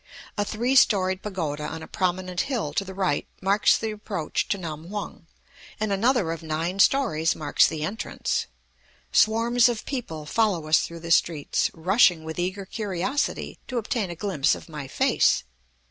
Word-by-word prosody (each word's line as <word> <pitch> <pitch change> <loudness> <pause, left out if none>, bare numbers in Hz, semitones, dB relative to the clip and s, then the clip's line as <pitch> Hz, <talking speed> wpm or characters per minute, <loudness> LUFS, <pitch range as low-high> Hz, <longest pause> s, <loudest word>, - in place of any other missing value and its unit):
A 205 - +1
three 235 +5 -1
storied 190 -7 +4
pagoda 160 -8 -3
on 160 +1 -6
a - - -9
prominent 185 -1 -1
hill 235 - -2
to 195 - 0
the 190 -1 -9
right 185 -6 0
marks 195 +2 +3
the 220 - -3
approach 200 -6 -3
to 200 - 0
Nam 165 -2 -7
hung, 200 -5 -6 0.5
and 215 -1 -1
another 220 -3 +2
of 165 - -5
nine 165 +4 -3
stories 200 - +3
marks 145 -2 +3
the 155 -2 -4
entrance. 200 +8 -2 0.6
Swarms 230 +2 +4
of 235 -3 -4
people 165 - -5
follow 195 -2 +1
us 155 +1 +5
through 170 0 -6
the 165 0 -5
streets, 160 -3 +2
rushing 180 -1 +4
with 160 +1 -6
eager 185 +2 -2
curiosity 210 +7 -2
to 255 - -3
obtain 225 -3 -1
a 175 - -5
glimpse 165 -6 +1
of - - -11
my 150 -4 -7
face. - - +2
185 Hz, 165 wpm, -25 LUFS, 160-215 Hz, 0.6 s, us